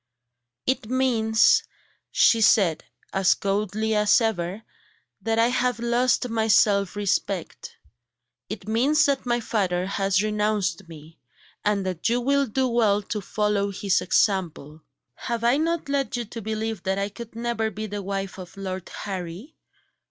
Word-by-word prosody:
"It 255 Hz, -3 st, -1 dB
means," 235 Hz, -4 st, +3 dB, 0.5 s
she 230 Hz, -, +4 dB
said, 195 Hz, -8 st, +3 dB, 0.3 s
as 195 Hz, -1 st, +3 dB
coldly 210 Hz, +2 st, -1 dB
as 210 Hz, +2 st, +4 dB
ever, 205 Hz, -2 st, -2 dB, 0.6 s
"that 225 Hz, 0 st, -1 dB
I 230 Hz, +1 st, +4 dB
have 250 Hz, 0 st, 0 dB
lost 240 Hz, +1 st, +1 dB
my 225 Hz, -2 st, -1 dB
self 200 Hz, -3 st, +3 dB
respect; 195 Hz, -3 st, -2 dB, 0.7 s
it 210 Hz, -1 st, -7 dB
means 275 Hz, +8 st, +3 dB
that 275 Hz, -3 st, 0 dB
my 240 Hz, 0 st, +1 dB
father 185 Hz, -6 st, -1 dB
has 195 Hz, 0 st, +1 dB
renounced 210 Hz, -4 st, -1 dB
me, 160 Hz, 0 st, -13 dB, 0.4 s
and 205 Hz, -2 st, 0 dB
that 185 Hz, +2 st, -1 dB
you 240 Hz, +1 st, +2 dB
will 280 Hz, +2 st, +1 dB
do 260 Hz, +4 st, 0 dB
well 215 Hz, -4 st, +2 dB
to 210 Hz, +1 st, -4 dB
follow 205 Hz, +1 st, 0 dB
his 200 Hz, -1 st, 0 dB
example. 170 Hz, -7 st, 0 dB, 0.3 s
Have 235 Hz, -, -4 dB
I 240 Hz, +3 st, +4 dB
not 330 Hz, +1 st, -1 dB
led 275 Hz, -3 st, -1 dB
you 240 Hz, -, -3 dB
to 230 Hz, +2 st, -8 dB
believe 220 Hz, +1 st, -3 dB
that 190 Hz, 0 st, -1 dB
I 200 Hz, +1 st, -1 dB
could 225 Hz, +2 st, -10 dB
never 230 Hz, -1 st, -1 dB
be 215 Hz, +1 st, -6 dB
the 205 Hz, -1 st, -5 dB
wife 195 Hz, 0 st, -4 dB
of 180 Hz, +1 st, -11 dB
Lord 190 Hz, -2 st, -5 dB
Harry? 190 Hz, -, -6 dB
215 Hz, 150 wpm, -24 LUFS, 195-235 Hz, 0.7 s, she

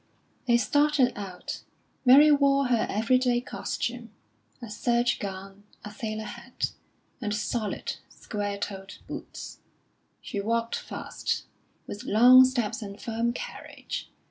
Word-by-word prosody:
They 235 Hz, -1 st, +5 dB
started 290 Hz, 0 st, +3 dB
out. 190 Hz, -3 st, -6 dB, 0.4 s
Mary 285 Hz, +4 st, +8 dB
wore 275 Hz, -2 st, +4 dB
her 235 Hz, -3 st, +2 dB
every 225 Hz, +5 st, +2 dB
day 245 Hz, -2 st, +2 dB
costume 245 Hz, -, -4 dB, 0.5 s
a 240 Hz, -, -8 dB
serge 240 Hz, +3 st, +1 dB
gown, 195 Hz, 0 st, -7 dB, 0.2 s
a 210 Hz, -, -6 dB
sailor 215 Hz, 0 st, -4 dB
hat, 235 Hz, +3 st, -4 dB, 0.5 s
and 210 Hz, -2 st, -1 dB
solid, 215 Hz, 0 st, -2 dB
square 205 Hz, -2 st, -4 dB
toed 195 Hz, -1 st, -6 dB
boots. -, -, -8 dB, 0.6 s
She 205 Hz, -, -5 dB
walked 230 Hz, +3 st, 0 dB
fast, -, -, -4 dB, 0.4 s
with 205 Hz, -, -7 dB
long 250 Hz, +4 st, +8 dB
steps 240 Hz, -2 st, -1 dB
and 200 Hz, -1 st, -7 dB
firm 230 Hz, +1 st, -1 dB
carriage. -, -, -7 dB
230 Hz, 120 wpm, -27 LUFS, 205-250 Hz, 0.6 s, Mary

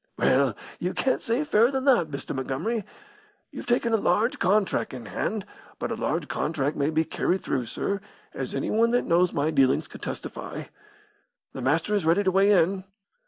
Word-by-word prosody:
"Well, 130 Hz, -4 st, +3 dB, 0.2 s
you 180 Hz, +1 st, -2 dB
can't 260 Hz, -, +1 dB
say 235 Hz, +6 st, 0 dB
fairer 235 Hz, -5 st, +4 dB
than 265 Hz, -1 st, -2 dB
that, 245 Hz, -, +4 dB
Mr. 140 Hz, -2 st, -5 dB
Montgomery. 155 Hz, -, -2 dB, 0.7 s
You've -, -, -8 dB
taken 240 Hz, -1 st, +1 dB
a -, -, +5 dB
large 210 Hz, +4 st, +1 dB
contrac' 195 Hz, -7 st, +1 dB
in 120 Hz, -3 st, -8 dB
hand, 215 Hz, -2 st, -3 dB, 0.3 s
but -, -, -3 dB
a -, -, -1 dB
large -, -, -2 dB
contrac' 150 Hz, -2 st, -1 dB
may 140 Hz, +1 st, +1 dB
be 160 Hz, +1 st, +1 dB
carried 185 Hz, +4 st, -1 dB
through, 125 Hz, -4 st, -1 dB
sir, 200 Hz, -, -2 dB, 0.3 s
as -, -, -4 dB
anyone 230 Hz, +2 st, +2 dB
that 245 Hz, -, +2 dB
knows 175 Hz, +1 st, +3 dB
my 145 Hz, +2 st, 0 dB
dealings 135 Hz, -3 st, +3 dB
could -, -, -12 dB
testify. -, -, -6 dB, 0.9 s
The 130 Hz, -, -6 dB
Master 160 Hz, +10 st, +1 dB
is 205 Hz, -4 st, +1 dB
ready 170 Hz, +6 st, +3 dB
to 190 Hz, -, +2 dB
weigh 195 Hz, +2 st, +4 dB
in!" 190 Hz, 0 st, +3 dB
180 Hz, 180 wpm, -26 LUFS, 145-220 Hz, 0.9 s, a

